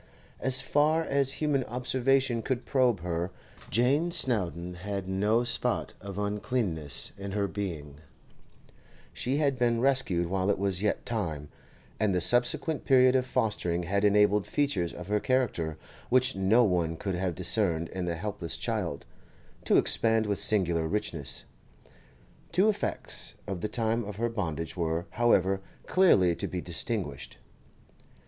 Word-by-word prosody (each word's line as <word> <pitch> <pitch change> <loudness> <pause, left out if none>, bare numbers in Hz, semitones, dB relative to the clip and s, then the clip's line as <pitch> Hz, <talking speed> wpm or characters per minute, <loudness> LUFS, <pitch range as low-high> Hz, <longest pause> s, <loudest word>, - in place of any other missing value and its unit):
As 130 -1 +3
far 155 +3 +2
as 140 -2 +1
human 145 -3 0
observation 125 0 +1
could 130 0 -2
probe 125 -8 +2
her, 85 0 -2 0.4
Jane 135 +9 +2
Snowdon 90 - -2
had 100 -1 -4
no 105 +5 +1
spot 120 - -2
of 100 -1 -7
uncleanness 100 - -2
in 100 -1 -5
her 100 -1 0
being; 80 -8 -5 1.1
she 130 +3 -1
had 140 -4 +1
been 120 -1 +2
rescued 125 -10 +2
while 95 +2 -1
it 100 - +2
was 95 -1 -1
yet 105 - -1
time, 80 -11 -3 0.5
and 105 -3 +1
the - - +2
subsequent 140 - +2
period 130 -1 +5
of 130 -1 +1
fostering 105 -9 0
had 100 +4 0
enabled 105 0 +4
features 140 - 0
of 90 - -9
her 105 +1 +1
character, 100 -12 0 0.3
which 130 +1 +3
no 95 +6 +4
one 85 -5 0
could 95 +3 -3
have 90 -1 -2
discerned 85 -2 +1
in 95 -1 -4
the 85 -1 -2
helpless 90 -2 -4
child, - - -3 0.6
to - - +4
expand 110 -1 +3
with 100 -1 -1
singular 85 -6 +1
richness. 90 -7 -2 1.1
Two 190 +6 +4
effects 210 - -2
of 95 -4 -5
the - - -1
time 115 0 0
of 105 -1 -7
her 120 +3 -1
bondage 80 -8 -3
were, 85 -1 -1
however, 95 -5 +2 0.2
clearly 95 - +4
to - - -1
be 90 - -4
distinguished. 85 - -3
105 Hz, 145 wpm, -28 LUFS, 90-125 Hz, 1.1 s, period